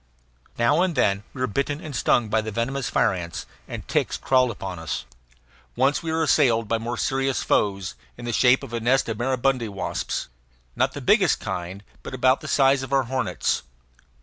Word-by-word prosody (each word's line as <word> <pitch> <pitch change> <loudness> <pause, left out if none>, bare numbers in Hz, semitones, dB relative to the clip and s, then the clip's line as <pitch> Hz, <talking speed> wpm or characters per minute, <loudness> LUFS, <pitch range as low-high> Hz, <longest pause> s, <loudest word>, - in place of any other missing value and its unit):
Now 120 +8 +3
and 180 -3 +1
then 100 -6 +2
we 130 - -8
were - - +3
bitten 140 +5 -2
and 155 -5 -7
stung 120 -1 +2
by 110 +1 +1
the 110 - -5
venomous 120 +5 -2
fire 110 - +2
ants, 85 -2 -5 0.2
and - - -7
ticks - - 0
crawled 130 -1 +3
upon 95 -5 -6
us. 80 -1 -4 0.7
Once 135 +4 +2
we 165 -1 -3
were 160 0 +1
assailed 120 -8 +3
by 115 +1 0
more 120 +2 -4
serious 135 0 0
foes, 95 -3 0 0.2
in 120 - -8
the 120 - -2
shape 125 +4 +4
of 125 -4 -9
a 115 - -1
nest 130 +4 +2
of 110 -1 -3
maribundi 130 -1 0
wasps, 100 -1 -3 0.5
not - - +1
the - - -6
biggest - - +3
kind, 90 +3 -5 0.2
but - - -7
about 130 +1 +3
the - - -7
size 135 -1 +4
of 130 0 -7
our 135 -1 +3
hornets. 130 - -1
125 Hz, 195 wpm, -24 LUFS, 110-135 Hz, 0.7 s, shape